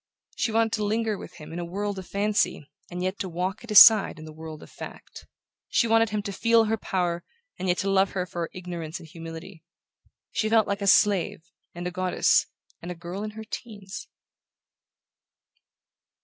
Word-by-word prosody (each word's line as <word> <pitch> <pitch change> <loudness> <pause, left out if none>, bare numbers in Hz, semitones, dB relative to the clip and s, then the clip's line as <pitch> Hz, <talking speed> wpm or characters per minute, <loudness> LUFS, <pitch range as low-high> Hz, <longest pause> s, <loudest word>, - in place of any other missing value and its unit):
She 230 - 0
wanted 225 0 +2
to 215 - 0
linger 220 +1 0
with - - -10
him 155 0 -10
in 175 - -4
a - - -3
world 200 +3 -3
of 185 - -9
fancy 205 -7 0 0.2
and 180 0 -4
yet 185 +2 -2
to 190 - -3
walk 180 +5 -3
at 235 - -12
his 210 - +10
side 220 -8 +7
in 155 - -10
the 155 - -10
world 160 0 -9
of - - -15
fact. - - -10 0.4
She 235 - +2
wanted 225 0 +4
him 210 -1 -2
to 200 - -4
feel 230 +3 +4
her 220 0 +1
power 175 -5 -2 0.4
and 190 - -2
yet 180 0 +2
to 195 - -1
love 195 0 +3
her 180 -2 -1
for 175 -1 -6
her 165 - -2
ignorance 170 -3 -6
and 165 - -12
humility. 165 +2 -9 0.7
She 215 - 0
felt 220 -1 +4
like 200 +1 -2
a 200 - -1
slave, 195 -5 +3 0.3
and 175 +1 -6
a 180 - -2
goddess, 185 0 +2 0.3
and 175 - -7
a 180 - -4
girl 175 +3 -6
in 215 - -3
her 220 - -6
teens... 205 -4 -8
190 Hz, 200 wpm, -26 LUFS, 175-215 Hz, 0.7 s, his